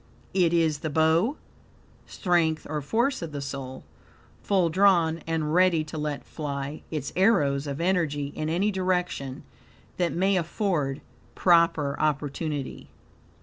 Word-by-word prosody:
"It 180 -3 +3
is 160 -3 +2
the 155 - -3
bow 160 - +2 0.7
(strength 170 -4 0
or 150 0 -3
force 235 - 0
of 165 -2 -5
the 145 - -3
soul), 135 -2 -6 0.6
FULL 185 -4 +2
drawn 170 -3 +3
and 160 -2 -1
ready 180 -3 +4
to 155 +1 -9
let 150 -2 -3
fly" 140 -1 -5
its 150 -3 -4
arrows 150 -8 +2
(of 140 0 -4
energy) 165 -6 0
in 155 - -2
any 190 +6 +1
direction 180 -7 -2 0.5
that 175 -2 +1
may 190 +2 +2
afford 165 -6 -1 0.3
proper 165 -5 +3
opportunity. 145 -1 -2
160 Hz, 130 wpm, -26 LUFS, 145-180 Hz, 0.7 s, ready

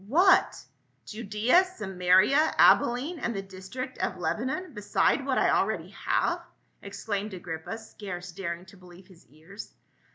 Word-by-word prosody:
" - - -19
What! 375 +1 +4 0.4
Judaea, 220 - +2
Samaria, 210 - +2
Abilene 270 +8 +4
and 235 -3 -2
the 195 - -4
district 195 +8 -8
of 190 - -2
Lebanon, 255 - -3
beside 205 0 +1
what - - -1
I - - +3
already - - 0
have?" - - -1 0.4
exclaimed 200 0 -4
Agrippa, 175 +3 -6
scarce 190 -5 -8
daring 175 -1 -5
to 190 +2 -16
believe 180 0 -16
his 185 -3 -20
ears. 160 - -12
200 Hz, 135 wpm, -27 LUFS, 180-235 Hz, 0.4 s, What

